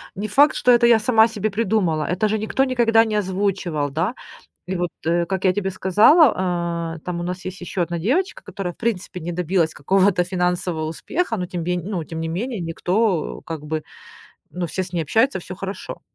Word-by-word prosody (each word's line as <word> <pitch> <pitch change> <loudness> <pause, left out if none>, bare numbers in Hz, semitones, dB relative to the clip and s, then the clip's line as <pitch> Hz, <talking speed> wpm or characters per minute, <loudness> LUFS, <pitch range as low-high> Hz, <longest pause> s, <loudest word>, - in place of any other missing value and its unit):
не 205 +2 -3
факт, 285 +8 +4
что 250 - +3
это 240 -1 +5
я 235 -2 +6
сама 225 -1 +4
себе 220 -2 -2
придумала. 195 -7 0
Это 185 +5 0
же 215 +1 0
никто 220 +5 0
никогда 235 -4 +3
не 215 -1 -2
озвучивал, 190 -6 -1
да? 165 - -1 0.5
И 190 - -2
вот, 175 -1 -1 0.2
э, 170 +1 +2
как 190 +1 -3
я 185 -1 +4
тебе 195 0 -1
сказала, 185 - +3
э, - - -12
там 180 -1 -4
у - - -3
нас 180 +1 -4
есть 185 0 -6
еще 180 +1 -3
одна 170 0 -1
девочка, 295 - -1
которая 180 -3 -5
в - - -30
принципе 200 -5 -2
не 175 +1 -5
добилась 175 -1 0
какого-то 190 +3 +2
финансового 180 -2 -1
успеха, 235 - -2
но 180 -4 -3
тем 175 -2 -4
ме 180 +1 -1
ну, 185 -3 -3
тем 160 +1 -6
не 165 - -2
менее, 215 +8 -3
никто 180 +2 -1
как 160 -2 -7
бы, 155 0 -3 0.7
ну, 180 -1 -3
все 170 +4 -2
с 180 -1 -8
ней 170 -2 0
общаются, 220 - +1
всё 185 - -8
хорошо. 195 0 -6
185 Hz, 205 wpm, -22 LUFS, 170-215 Hz, 0.7 s, я